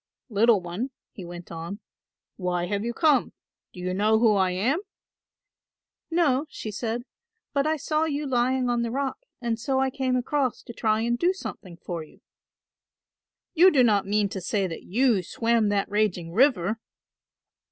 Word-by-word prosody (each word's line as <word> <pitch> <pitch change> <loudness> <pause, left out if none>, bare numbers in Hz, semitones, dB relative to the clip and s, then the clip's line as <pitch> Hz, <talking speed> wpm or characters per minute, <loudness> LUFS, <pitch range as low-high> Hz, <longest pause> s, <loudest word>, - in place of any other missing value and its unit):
"Little 225 0 +4
one," 180 +9 -4 0.2
he 195 - -9
went 175 0 -9
on, 170 +5 -6 0.6
"why 180 -2 -1
have 200 +2 -2
you 235 - -1
come; 300 +2 +2 0.4
do - - -12
you 180 0 -2
know 210 +3 +3
who 220 -1 +4
I 190 -2 +3
am?" 220 - +1 1.3
"No," 315 -4 +2
she 215 - -6
said, 230 +3 -3 0.5
"but 280 0 +1
I 315 0 +1
saw 305 +2 0
you 300 -1 -2
lying 255 0 +1
on 240 -1 +1
the 235 - -1
rock 270 +2 -2 0.2
and 230 -2 -1
so 265 +3 0
I 265 0 +1
came 260 -1 0
across 255 0 0
to 235 - -9
try 220 -1 +1
and 240 +1 0
do 360 +2 +3
something 185 - -8
for 170 -1 -5
you." 155 - -18 1.3
"You 365 +2 +7
do 275 -8 +4
not 205 -4 +3
mean 205 0 +2
to 190 - -5
say 195 +2 0
that 165 -3 -5
you 230 0 +2
swam 230 +3 +1
that 200 -1 +1
raging 200 -5 0
river?" 225 -4 +3
225 Hz, 170 wpm, -26 LUFS, 195-265 Hz, 1.3 s, You